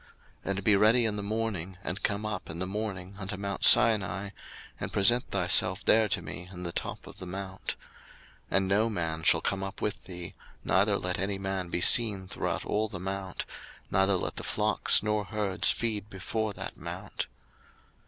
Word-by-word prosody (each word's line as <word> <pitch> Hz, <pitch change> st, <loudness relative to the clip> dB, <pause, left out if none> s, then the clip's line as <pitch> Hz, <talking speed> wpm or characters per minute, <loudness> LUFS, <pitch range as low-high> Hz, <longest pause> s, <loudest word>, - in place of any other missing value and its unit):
02:034:002 -, -, -24 dB, 0.4 s
And 100 Hz, 0 st, -1 dB
be 105 Hz, -1 st, +4 dB
ready 110 Hz, +4 st, +5 dB
in 110 Hz, -2 st, 0 dB
the 105 Hz, -, -3 dB
morning, 100 Hz, -4 st, -3 dB
and 90 Hz, +3 st, -4 dB
come 105 Hz, +1 st, -1 dB
up 105 Hz, -3 st, -4 dB
in 80 Hz, -, -5 dB
the 95 Hz, -, -2 dB
morning 100 Hz, -1 st, -5 dB
unto 100 Hz, 0 st, -5 dB
mount 100 Hz, 0 st, -4 dB
Sinai, 100 Hz, -3 st, +5 dB, 0.5 s
and -, -, -4 dB
present 120 Hz, +6 st, +3 dB
thyself 95 Hz, 0 st, +4 dB
there 110 Hz, -1 st, +4 dB
to 95 Hz, -6 st, 0 dB
me 90 Hz, +3 st, -8 dB
in 90 Hz, -1 st, -8 dB
the 85 Hz, -, -4 dB
top -, -, -5 dB
of -, -, -12 dB
the 90 Hz, -, -7 dB
mount. 95 Hz, 0 st, -5 dB, 0.7 s
02:034:003 -, -, +2 dB
And 95 Hz, 0 st, +1 dB
no 105 Hz, +4 st, +2 dB
man 80 Hz, -6 st, -3 dB
shall 80 Hz, 0 st, +4 dB
come 95 Hz, +2 st, -1 dB
up 95 Hz, +1 st, -6 dB
with 105 Hz, -, -3 dB
thee, 90 Hz, -2 st, -8 dB, 0.3 s
neither 100 Hz, +5 st, +3 dB
let 90 Hz, -2 st, -2 dB
any 100 Hz, +1 st, -1 dB
man 95 Hz, -2 st, -3 dB
be 85 Hz, -, -2 dB
seen 100 Hz, -3 st, +5 dB
throughout -, -, -3 dB
all 110 Hz, +1 st, 0 dB
the 100 Hz, -4 st, -7 dB
mount; 95 Hz, 0 st, -4 dB, 0.5 s
neither 95 Hz, 0 st, +3 dB
let 90 Hz, -, -3 dB
the -, -, -4 dB
flocks -, -, +2 dB
nor 105 Hz, -1 st, 0 dB
herds 100 Hz, -1 st, +1 dB
feed 105 Hz, -3 st, -1 dB
before 110 Hz, +3 st, -3 dB
that -, -, -7 dB
mount. -, -, -6 dB
95 Hz, 190 wpm, -29 LUFS, 95-105 Hz, 0.7 s, ready